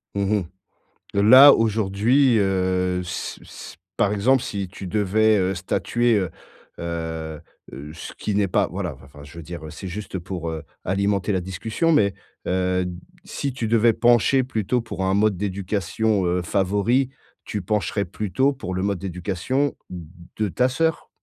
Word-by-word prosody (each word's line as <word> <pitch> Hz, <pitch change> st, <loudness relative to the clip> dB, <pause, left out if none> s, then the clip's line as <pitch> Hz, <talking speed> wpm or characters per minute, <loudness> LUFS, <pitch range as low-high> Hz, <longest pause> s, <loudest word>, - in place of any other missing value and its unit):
Mmh 100 Hz, -, 0 dB, 0.2 s
mh. 95 Hz, -, -4 dB, 0.7 s
Heu, 100 Hz, -, +3 dB
là 130 Hz, +7 st, +9 dB
aujourd'hui, 115 Hz, +4 st, +2 dB
heu, 95 Hz, -2 st, +1 dB
s 90 Hz, -, -5 dB
s -, -, -11 dB, 0.2 s
par 105 Hz, 0 st, +2 dB
exemple, 125 Hz, +5 st, +2 dB
si 100 Hz, -6 st, -4 dB
tu 95 Hz, +1 st, -9 dB
devais, 105 Hz, +3 st, +2 dB
heu, 95 Hz, 0 st, 0 dB
statuer, 120 Hz, +6 st, +1 dB
heu, 95 Hz, -3 st, -2 dB, 0.5 s
heu, 80 Hz, -2 st, -5 dB, 0.3 s
heu, 70 Hz, +3 st, -8 dB
ce 80 Hz, -, -8 dB
qui 105 Hz, -, -3 dB
n'est 100 Hz, -1 st, +2 dB
pas 90 Hz, -, +1 dB
voilà, -, -, -4 dB
vin -, -, -16 dB
enfin, 70 Hz, +1 st, -14 dB
je 70 Hz, +4 st, -13 dB
veux 85 Hz, -, -7 dB
dire, 85 Hz, 0 st, -8 dB
heu, -, -, -7 dB
c'est 95 Hz, -, -8 dB
juste, 100 Hz, +2 st, -6 dB
heu, -, -, -1 dB
pour, 85 Hz, -1 st, -5 dB
heu, 80 Hz, -2 st, -6 dB, 0.2 s
alimenter 100 Hz, +1 st, 0 dB
la 95 Hz, -, 0 dB
discussion 110 Hz, -, -1 dB
mais 100 Hz, -10 st, +3 dB, 0.3 s
heu, 90 Hz, 0 st, 0 dB, 0.4 s
si 140 Hz, -, -4 dB
tu 120 Hz, -3 st, -3 dB
devais 115 Hz, 0 st, +4 dB
pencher 120 Hz, +3 st, +4 dB
plutôt 120 Hz, 0 st, -1 dB
pour 115 Hz, -4 st, -5 dB
un 95 Hz, -, +1 dB
mode 105 Hz, 0 st, +3 dB
d'éducation, 100 Hz, +1 st, -1 dB
heu, 90 Hz, +1 st, +1 dB
favori, 105 Hz, +8 st, +1 dB, 0.4 s
tu 105 Hz, -, -4 dB
pencherais 100 Hz, +1 st, -1 dB
plutôt 110 Hz, +9 st, 0 dB
pour 95 Hz, -8 st, -6 dB
le 95 Hz, -, -1 dB
mode 100 Hz, -2 st, -1 dB
d'éducation 95 Hz, +10 st, -2 dB
de 90 Hz, +4 st, -6 dB
ta 125 Hz, +7 st, +1 dB
sœur? 160 Hz, +4 st, -1 dB
100 Hz, 170 wpm, -23 LUFS, 90-110 Hz, 0.7 s, là